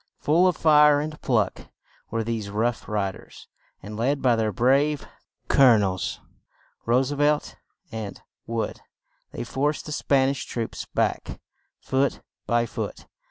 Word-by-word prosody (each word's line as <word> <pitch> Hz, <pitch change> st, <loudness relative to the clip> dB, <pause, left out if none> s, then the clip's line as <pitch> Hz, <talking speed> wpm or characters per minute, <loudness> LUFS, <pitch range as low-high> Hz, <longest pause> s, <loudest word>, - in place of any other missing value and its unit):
Full 170 Hz, +5 st, +3 dB
of 180 Hz, -, +1 dB
fire 150 Hz, -2 st, +6 dB
and 155 Hz, +1 st, -5 dB
pluck 110 Hz, -8 st, 0 dB, 0.4 s
were 115 Hz, -1 st, -1 dB
these 110 Hz, -2 st, -3 dB
"Rough 115 Hz, +3 st, -1 dB
Ri 100 Hz, -2 st, 0 dB
ders," -, -, -15 dB, 0.4 s
and 105 Hz, +2 st, -7 dB
led 135 Hz, +6 st, 0 dB
by 125 Hz, -3 st, +3 dB
their 110 Hz, -1 st, 0 dB
brave 135 Hz, +7 st, +2 dB, 0.4 s
colo 130 Hz, -4 st, +6 dB
nels, 95 Hz, -3 st, -1 dB, 0.7 s
Roose 130 Hz, +3 st, +2 dB
velt 145 Hz, +1 st, +1 dB, 0.4 s
and 110 Hz, -3 st, -6 dB, 0.3 s
Wood, 115 Hz, -1 st, -3 dB, 0.5 s
they -, -, -5 dB
forced 145 Hz, +3 st, -1 dB
the 150 Hz, -, -7 dB
Span 135 Hz, -2 st, +2 dB
ish 140 Hz, -, -3 dB
troops 115 Hz, -2 st, -4 dB
back, -, -, -2 dB, 0.4 s
foot 135 Hz, +1 st, 0 dB, 0.3 s
by 120 Hz, +1 st, +2 dB
foot. -, -, -6 dB
125 Hz, 140 wpm, -25 LUFS, 110-145 Hz, 0.7 s, fire